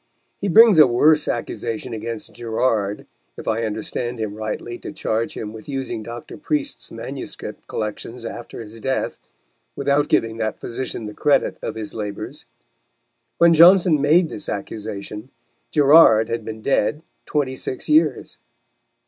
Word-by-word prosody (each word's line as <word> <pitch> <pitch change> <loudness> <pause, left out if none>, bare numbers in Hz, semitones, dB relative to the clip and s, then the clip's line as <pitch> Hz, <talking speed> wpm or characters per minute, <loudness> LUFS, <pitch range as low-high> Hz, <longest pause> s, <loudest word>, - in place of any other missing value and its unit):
He 200 - -2
brings 220 -1 +7
a 150 - +9
worse 150 +5 +4
accusation 115 0 -3
against 115 0 -6
Gerard, 110 -3 -1 0.3
if - - -9
I 115 +1 0
understand 110 +3 -4
him 110 -2 -3
rightly 110 +2 -5
to - - -7
charge 115 +1 -2
him 105 0 -6
with 110 +5 -11
using 135 -5 -3
Dr. 120 +1 -8
Priest's 150 -1 -2
manuscript - - -7
collections 115 +2 -5
after 120 - -7
his 110 +1 -12
death, 130 +3 -2 0.6
without 140 +1 +1
giving 115 0 +1
that 110 -1 -2
physician 120 -1 -4
the 105 - -6
credit 145 +5 +1
of - - -4
his 110 -2 -6
labours. 105 -2 -6 0.9
When 170 0 +6
Johnson 170 -2 +6
made 160 +4 +4
this 155 - -7
accusation, 105 +2 -6 0.4
Gerard 140 -7 +6
had 115 -1 -2
been 110 0 -7
dead 140 +3 +1 0.2
twenty 135 -3 -1
six 130 - -5
years. 155 -4 +2
120 Hz, 140 wpm, -21 LUFS, 110-145 Hz, 0.9 s, a